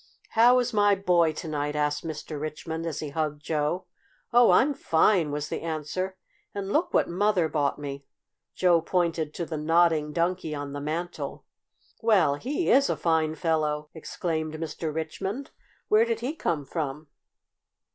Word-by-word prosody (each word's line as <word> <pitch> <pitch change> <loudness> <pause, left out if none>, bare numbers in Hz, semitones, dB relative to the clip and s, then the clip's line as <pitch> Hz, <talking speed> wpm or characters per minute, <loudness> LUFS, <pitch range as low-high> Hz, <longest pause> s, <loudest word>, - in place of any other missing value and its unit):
"How 240 +2 +5
is 250 -1 0
my 205 -1 +4
boy 175 -4 +3
to 165 - -6
night?" 150 -1 -2
asked 150 0 0
Mr. 155 -2 -6
Richmond, 160 +2 -4
as 160 - -4
he 155 - -4
hugged 150 0 -3
Joe. 155 +4 -1 0.5
"Oh, 240 0 +7
I'm 285 +3 +5
fine!" 165 - +2
was 145 +1 -3
the - - -3
answer. 165 +4 -3 0.4
"And 200 -1 -3
look 325 +4 +1
what - - +3
Mother 185 -1 +2
bought 145 -3 0
me!" 140 -1 -7 0.5
Joe 175 -3 +4
pointed 165 -3 0
to 170 - -3
the 160 -1 -4
Nodding 160 -1 +3
Donkey 170 -1 -1
on 145 -1 -5
the 145 - -5
mantel. 165 +4 -4 0.6
"Well, 200 -10 +4
he 275 - -1
is 275 +2 +5
a - - 0
fine 160 -2 +1
fellow!" 150 -2 -1
exclaimed 160 -1 -3
Mr. 160 0 -4
Richmond. 190 - -4 0.4
"Where 215 +2 +5
did 230 -1 -2
he 260 +5 -2
come 165 - -1
from?" 150 0 -4
160 Hz, 160 wpm, -27 LUFS, 150-185 Hz, 0.6 s, Oh